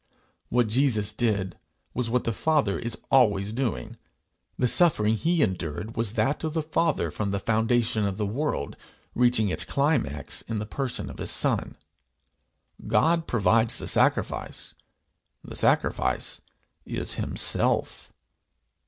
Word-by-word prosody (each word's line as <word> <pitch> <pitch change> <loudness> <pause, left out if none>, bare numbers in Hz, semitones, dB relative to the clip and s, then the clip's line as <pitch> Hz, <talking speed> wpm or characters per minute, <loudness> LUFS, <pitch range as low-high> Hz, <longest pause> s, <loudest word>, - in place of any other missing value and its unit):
What 120 0 +3
Jesus 110 -3 +1
did, 100 -5 -1 0.3
was 125 -1 -1
what 125 +1 +1
the 115 - -1
Father 145 -6 +1
is 120 -1 -4
always 105 -6 +3
doing; 115 - -3 0.6
the 125 - +2
suffering 115 -9 +3
he 165 +6 +2
endured 95 - -3
was 115 -2 0
that 140 +4 0
of 160 0 -3
the 160 - 0
Father 165 +2 0
from 105 -2 -2
the 100 - -1
foundation 110 0 +1
of 95 -1 -3
the 105 - -1
world, 115 - -2 0.4
reaching 120 -4 +3
its - - 0
climax 125 - -1
in 115 - -4
the 105 - -3
person 130 +3 -3
of - - -9
his - - -3
Son. - - 0 1.1
God 165 0 +2
provides 115 +1 +2
the - - -5
sacrifice; - - 0 0.7
the - - -9
sacrifice 65 -1 +1 0.4
is - - -2
himself. - - 0
115 Hz, 135 wpm, -26 LUFS, 105-135 Hz, 1.1 s, What